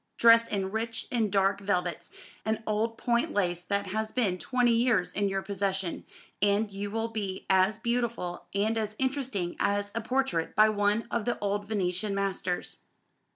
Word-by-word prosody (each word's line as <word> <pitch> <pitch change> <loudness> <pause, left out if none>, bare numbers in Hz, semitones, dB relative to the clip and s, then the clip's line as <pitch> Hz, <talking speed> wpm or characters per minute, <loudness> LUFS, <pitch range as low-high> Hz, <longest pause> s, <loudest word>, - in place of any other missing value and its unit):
Dress 230 0 +7
in 195 -3 -2
rich 225 +1 -2
and 225 -5 +1
dark 195 0 +2
velvets, 180 -4 -1 0.3
and 220 +1 -1
old 220 +2 -1
point 235 0 0
lace 175 -3 +1
that 200 +2 -1
has 215 +3 -2
been 200 -8 0
twenty 250 +1 +2
years 230 -5 +2
in 200 0 +1
your 195 0 -2
possession, 195 -2 -2 0.4
and 205 +1 +2
you 200 +1 -4
will 225 +2 -2
be 200 -4 -4
as 190 +3 +4
beautiful 235 -6 -2
and 220 +3 +1
as 215 -1 -3
interesting 260 -10 -1
as 205 0 0
a 230 - -2
portrait 250 -8 0
by 215 0 +6
one 205 +1 +1
of 235 -3 -1
the 240 - 0
old 205 0 -2
Venetian 200 -1 -1
masters. 190 -2 -1
205 Hz, 165 wpm, -29 LUFS, 195-225 Hz, 0.4 s, Dress